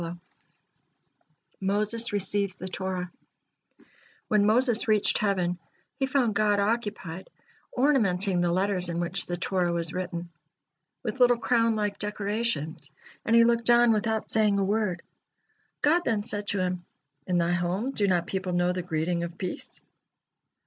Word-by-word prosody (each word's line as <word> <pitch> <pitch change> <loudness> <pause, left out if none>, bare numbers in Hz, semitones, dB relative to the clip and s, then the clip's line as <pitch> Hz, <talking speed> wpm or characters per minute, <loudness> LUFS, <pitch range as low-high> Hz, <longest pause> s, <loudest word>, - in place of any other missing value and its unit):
MOSES 210 +4 0
RECEIVES 200 -1 0
THE 185 - -7
TORAH 185 -1 -4 1.2
When 210 -1 +3
Moses 235 +1 +2
reached 215 -2 +2
heaven, 180 -4 0 0.4
he 270 - +1
found 255 -5 +1
God 205 0 +2
occupied 205 -5 -2 0.4
ornamenting 200 -9 +2
the 175 -1 +1
letters 185 0 0
in 170 0 -2
which 175 +1 -1
the 175 - -3
Torah 180 -1 0
was 170 -1 -2
written, 175 -2 -5 0.7
with 245 +2 -4
little 245 -1 +5
crown 230 -1 +2
like 205 -1 -2
decorations, 205 -8 -3 0.4
and 230 - +3
he 230 - +7
looked 235 0 +2
on 240 -1 +6
without 220 0 -1
saying 215 -2 +3
a 200 - +1
word. 195 -3 -1 0.8
God 325 +4 +4
then 220 -7 0
said 205 -2 -5
to 205 - +1
him: 180 -1 -2 0.4
"In 180 - +1
thy 170 0 +1
home, 175 +8 -1
do 205 -6 +1
not 175 -2 +1
people 190 -1 -3
know 175 0 +1
the 180 - -3
greeting 170 0 -1
of 170 0 -5
peace?" 185 - -5
200 Hz, 145 wpm, -27 LUFS, 180-220 Hz, 1.2 s, he